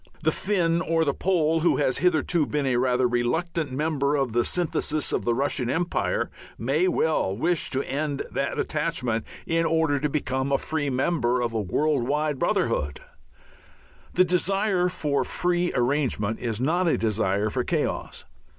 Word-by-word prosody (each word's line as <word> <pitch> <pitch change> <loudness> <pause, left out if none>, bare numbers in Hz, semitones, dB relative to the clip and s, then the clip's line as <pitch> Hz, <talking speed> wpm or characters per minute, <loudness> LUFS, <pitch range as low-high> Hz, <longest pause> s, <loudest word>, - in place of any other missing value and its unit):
The 160 - +3
Finn 170 -3 +1
or 165 -2 +1
the 140 - +1
Pole, 165 -3 +1
who 170 - +2
has 130 -3 +1
hitherto 170 -2 +2
been 150 -2 -1
a 125 -2 +1
rather 125 0 +2
reluctant 145 +6 -1
member 145 0 0
of 135 -5 0
the 120 0 +3
synthesis 160 -2 -1
of - - -1
the 120 - +2
Russian 135 -1 -1
empire, 175 +5 -1 0.3
may 140 +10 +1
well 155 - +1
wish 170 +6 0
to 135 +1 -1
end 145 +1 -2
that 140 - -2
attachment 140 -8 -1 0.2
in 165 0 +1
order 160 -3 +1
to 150 +2 0
become 135 -2 -1
a 140 - +4
free 145 -1 -1
member 125 -2 +1
of 120 -2 -1
a 110 - 0
worldwide 145 +6 0
brotherhood. 70 -1 0 1.1
The 185 - +5
desire 180 +1 +1
for 150 -6 0
free 175 0 0
arrangement 120 -4 0
is 115 -3 -2
not 170 +8 +1
a 165 - +2
desire 105 -1 0
for - - -1
chaos. - - -2
145 Hz, 160 wpm, -25 LUFS, 125-165 Hz, 1.1 s, The